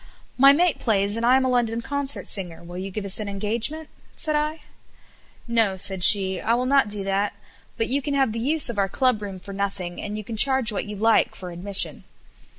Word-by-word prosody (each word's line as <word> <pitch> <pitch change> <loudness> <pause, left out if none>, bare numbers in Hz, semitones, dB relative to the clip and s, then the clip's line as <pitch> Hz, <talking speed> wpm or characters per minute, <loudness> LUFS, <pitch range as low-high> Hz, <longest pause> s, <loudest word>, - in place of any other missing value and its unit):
"My 275 +2 +7
mate 340 +3 +1
plays 205 -2 0
and 230 - -4
I 250 +2 +4
am 265 - 0
a - - 0
London 235 -2 0
concert 285 +3 -1
singer, 175 -4 -2
will 175 +1 -9
you 190 +1 -5
give 200 +1 -6
us 195 +1 +2
an 210 -1 -5
engagement?" 225 +10 -2 0.3
said 310 -2 +1
I. 305 +1 -2 0.9
'''No,'' 225 -5 0
said 190 -2 -3
she, 190 -1 +6
"I 230 - +1
will 250 +1 -2
not 270 -4 +2
do 205 -1 -1
that, 195 +1 -1 0.4
but 225 - +1
you 275 +3 0
can 285 +1 -3
have 270 -4 +1
the 230 - -5
use 290 +5 0
of 235 -4 -1
our 195 -1 0
club 250 0 0
room 195 -2 -7
for 200 +2 -11
nothing, 195 -3 -5
and 210 0 -6
you 215 - -6
can 220 +2 -7
charge 265 -1 +4
what 205 - -4
you 210 0 -7
like 225 +2 +1
for 180 -2 -9
admission." 190 +3 0
215 Hz, 225 wpm, -23 LUFS, 195-260 Hz, 0.9 s, My